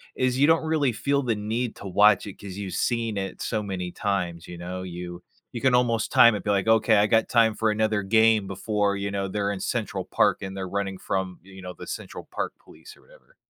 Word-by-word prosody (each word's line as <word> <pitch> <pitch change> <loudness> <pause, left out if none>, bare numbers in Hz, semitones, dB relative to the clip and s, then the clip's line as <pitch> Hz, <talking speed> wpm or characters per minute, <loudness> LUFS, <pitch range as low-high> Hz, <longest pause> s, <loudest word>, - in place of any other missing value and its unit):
is 130 0 0
you 145 - +5
don't 160 0 +3
really 155 -5 +1
feel 140 +5 0
the 120 -4 0
need 110 +3 -3
to - - -11
watch 105 +1 +4
it 100 - -9
'cause 100 -2 -8
you've 100 -2 -5
seen 115 -3 -1
it 95 -1 -4
so 110 -2 -1
many 95 -3 -4
times, 90 -5 -2
you 90 - -8
know? 90 +2 -6
You 90 -1 -7 0.3
you 120 - -6
can 130 -2 +3
almost 115 -3 +1
time 115 -2 +7
it, 105 - -5
be 105 - -3
like, 100 +1 +1
"Okay, 110 -1 +4
I 105 +1 +4
got 110 +1 +2
time 115 -2 +3
for 110 -1 +1
another 110 -1 0
game 110 0 +3
before, 100 +1 -1
you 100 0 -3
know, 100 -1 -2
they're 100 +1 -1
in 95 - -4
Central - - -2
Park, - - +1
and 95 0 -6
they're 95 -1 -4
running 100 0 -3
from, 95 -1 -3
you 95 +1 -13
know, 90 -1 -7
the - - -11
Central - - -7
Park - - -3
Police," - - -15
or - - -22
whatever. - - -22
105 Hz, 235 wpm, -25 LUFS, 95-115 Hz, 0.3 s, time